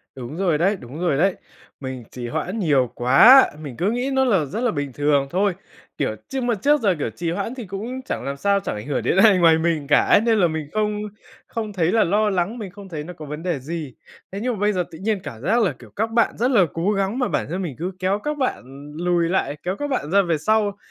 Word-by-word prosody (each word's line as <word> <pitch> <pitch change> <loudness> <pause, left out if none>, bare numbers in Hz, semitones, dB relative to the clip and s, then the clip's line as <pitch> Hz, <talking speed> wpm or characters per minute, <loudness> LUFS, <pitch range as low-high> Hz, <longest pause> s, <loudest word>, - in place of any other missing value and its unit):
Đúng 130 +5 -7
rồi 175 -6 +1
đấy, 195 +6 +2
đúng 130 +6 -9
rồi 170 -6 +1
đấy. 190 +3 +2 0.4
Mình 130 -3 -6
trì 120 -1 -6
hoãn 185 - -3
nhiều 135 - +2
quá, 135 - +7
mình 140 -6 -8
cứ 195 +5 +1
nghĩ 250 +3 -1
nó 265 0 +3
là 195 - +2
rất 210 - -5
là 245 - +1
bình 145 -4 -4
thường 145 -1 +1
thôi. 195 +3 +1 0.4
Kiểu, - - -1
trước 265 -2 -3
mà 240 -2 +1
trước 290 +7 +2
giờ, 195 -5 +2
kiểu, 120 - -1
trì 165 +6 -4
hoãn 200 +7 -3
thì 240 -5 -7
cũng 225 +8 -5
chẳng - - -4
làm 140 0 -4
sao, 200 +4 +2
chẳng 195 - -4
ảnh 105 +5 -7
hưởng 145 - -1
đến - - +1
ai 200 -1 +6
ngoài 165 -2 +5
mình 160 -3 -1
cả 145 - +5
ấy, - - +5
nên 225 -1 +2
là 175 - +4
mình 155 -2 -4
không 210 -1 0 0.5
không 220 -3 -5
thấy 175 -2 +1
là 225 - +4
lo 210 +4 +2
lắng, 190 +5 -1
mình 210 -4 -6
không 200 -1 -12
thấy 155 -3 -5
nó 180 +3 -8
có 155 - -10
vấn 150 +3 -7
đề 170 -6 -1
gì. 150 -2 -6 0.4
Thế 195 - -5
nhưng 250 +2 -1
mà 210 - -6
bây 210 0 +2
giờ 180 -1 0
tự 160 - -10
nhiên 210 0 -1
cảm 115 - -8
giác 230 - +2
là, 190 - +1
kiểu, - - -14
các 220 +2 -1
bạn 230 0 +1
rất 250 +3 +1
là 195 -7 +5
cố 170 +5 0
gắng 200 +4 -1
mà 250 - +1
bản - - -1
thân 185 +3 -3
mình 160 -8 -4
cứ 180 +3 -3
kéo 190 +2 0
các 300 +6 -3
bạn 255 - -1 0.3
lùi 175 -1 +1
lại, 150 -6 -1
kéo 185 +2 -2
các 290 - -2
bạn 175 - -2
ra 200 0 +5
về 170 -4 0
sau, 205 +3 +1
185 Hz, 265 wpm, -22 LUFS, 155-215 Hz, 0.5 s, quá